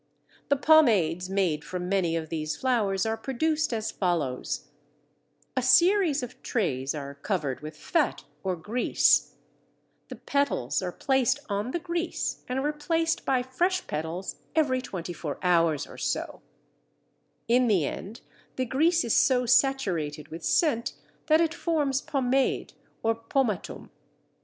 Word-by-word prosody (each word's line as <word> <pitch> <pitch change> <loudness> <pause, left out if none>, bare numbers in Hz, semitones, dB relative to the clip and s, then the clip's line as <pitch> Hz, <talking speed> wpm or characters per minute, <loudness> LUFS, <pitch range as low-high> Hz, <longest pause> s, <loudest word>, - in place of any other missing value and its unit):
The 285 - +4
pomades 215 - +4
made 180 -6 0
from 180 -1 -5
many 180 -4 +1
of 160 -1 -3
these 155 -2 -3
flowers 220 -6 +1
are 220 0 0
produced 300 +6 -1
as 220 -2 -2
follows: 165 -9 -2 0.9
A 255 - +1
series 320 +3 +4
of 245 +1 -8
trays 140 - -1
are 140 -1 -6
covered 140 -2 -2
with 155 +1 -9
fat 320 -6 0 0.2
or 190 -2 -1
grease; 210 +9 +2 0.7
the - - -8
petals 280 - 0
are 180 -1 -3
placed 265 +5 +1
on 205 +3 -1
the 305 - -1
grease 340 0 -3
and 260 +2 -1
replaced 325 +3 0
by 255 -2 +2
fresh 355 +9 0
petals 160 +5 -4 0.2
every 270 -5 +2
twenty 180 -7 -6
four 150 -3 -5
hours 165 -4 +3
or - - -12
so; - - -3 1.1
in 245 +2 +4
the 190 -9 +3
end 215 - -6 0.3
the 260 - -1
grease 320 +7 +2
is 230 - +1
so 250 -2 +4
saturated 190 - +1
with 165 +1 -8
scent 280 -9 +1 0.3
that 315 0 +5
it 330 -1 +1
forms 300 -6 0
pomade 265 -1 0 0.3
or 225 0 +3
pomatum. 230 -2 -2
235 Hz, 140 wpm, -27 LUFS, 175-280 Hz, 1.1 s, that